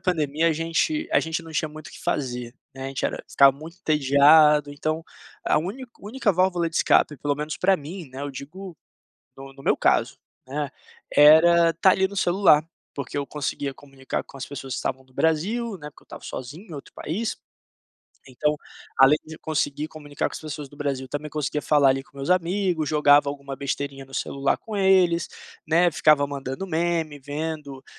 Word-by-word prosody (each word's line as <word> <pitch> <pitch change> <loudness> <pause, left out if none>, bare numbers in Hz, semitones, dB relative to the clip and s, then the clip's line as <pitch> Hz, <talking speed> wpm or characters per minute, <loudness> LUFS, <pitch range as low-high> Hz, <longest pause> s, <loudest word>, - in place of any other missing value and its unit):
pandemia, 160 -3 +1
a - - +2
gente 165 - -1
a - - +5
gente 160 +1 -3
não 165 -1 -11
tinha 155 0 -1
muito 155 0 -11
o - - -14
que - - -13
fazer, 125 -3 -3 0.2
né. 135 0 -7
A - - -3
gente 135 - -4
era - - -6
ficava 140 0 +5
muito 165 +4 -11
entediado. 150 0 +5
Então, 155 +3 -3 0.4
a - - +3
úni 200 +11 -5 0.2
única 210 0 0
válvula 180 -1 +1
de 160 - -6
escape, 150 - +3
pelo 145 +1 -1
menos 150 +1 -4
pra 190 0 +3
mim, 160 +1 -8
né, 130 +2 -8
eu 145 - -4
digo 165 +6 -9 0.6
no 135 0 -10
no 135 - -14
meu - - +3
caso, - - +1 0.3
né, 145 +1 -3 0.5
era 165 +3 +7
estar 175 +3 +4
ali 190 0 +2
no 200 - -11
celular, 175 -5 +4 0.3
porque 140 0 -5
eu 140 - -1
conseguia 145 -1 -3
comunicar 135 -2 -6
com 140 - -14
as 130 - -5
pessoas 135 -2 -7
que - - -3
estavam 130 0 -3
no 130 0 -27
Brasil, 195 - 0
né, 150 -2 -9
porque - - -21
eu - - -31
estava - - -11
sozinho 145 - -8
em - - -8
outro 140 - -10
país. 210 +9 -3 0.9
Então, 150 +4 0 0.4
além 135 +3 +7
de 160 0 -10
conseguir 150 -1 -2
comunicar 145 -2 -4
com - - -18
as - - -7
pessoas 150 -2 -7
do 145 - -17
Brasil, 140 -3 -3
também 145 +2 -5
conseguia 150 0 -2
falar 145 -3 +4
ali 135 0 0
com 140 - -24
meus 135 +2 -5
amigo. 180 -2 +1
Jogava 145 -1 +4
alguma 140 -1 -6
besteirinha 140 0 -4
no 135 - -19
celular 140 0 -1
com 220 -2 -7
eles, 185 -3 +3 0.4
né. 170 +2 +4
Ficava 150 -2 +4
mandando 140 +5 -5
meme, 165 -3 -1
vendo, 145 -1 -5
150 Hz, 195 wpm, -24 LUFS, 140-170 Hz, 0.9 s, era